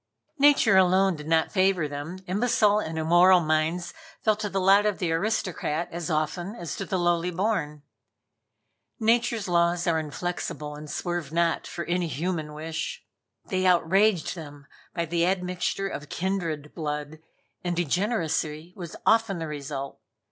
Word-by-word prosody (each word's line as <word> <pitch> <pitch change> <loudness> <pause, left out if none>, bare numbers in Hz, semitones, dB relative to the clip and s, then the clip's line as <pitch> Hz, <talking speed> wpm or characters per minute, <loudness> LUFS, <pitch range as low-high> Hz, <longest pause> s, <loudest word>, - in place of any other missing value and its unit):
Nature 275 -8 +5
alone 190 0 +4
did 150 0 -9
not 160 0 +2
favor 185 -5 +2
them 145 +5 -6
Imbecile 210 +1 +2
and 160 -5 -4
immoral 175 +3 +6
minds 160 +2 0 0.3
fell 215 -1 +2
to 210 0 -4
the 195 - -1
lot 195 +2 +5
of 210 -2 0
the 175 -3 -1
aristocrat 170 -3 -1
as 170 -1 -4
often 175 +6 -1
as 170 -8 -5
to 195 - -4
the 190 0 -1
lowly 175 0 +1
born. 175 -6 -2 1.2
Nature's 230 -1 +2
laws 170 0 +2
are 165 -3 +2
inflexible 150 -1 -4
and 150 0 -9
swerve 175 -4 -3
not 170 0 +1
for 170 - -5
any 175 0 0
human 155 -1 -3
wish. 165 - -5 0.4
They 185 -1 0
outraged 180 +1 +3
them 145 -4 -10 0.3
by 170 - 0
the 170 +1 0
admixture 180 +1 -1
of 145 -4 -7
kindred 170 -6 -3
blood, 150 -1 -4 0.4
and 175 -1 -1
degeneracy 170 - -1
was 175 -3 -8
often 225 -4 +3
the 165 - -4
result. 140 -2 -6
175 Hz, 150 wpm, -26 LUFS, 155-190 Hz, 1.2 s, immoral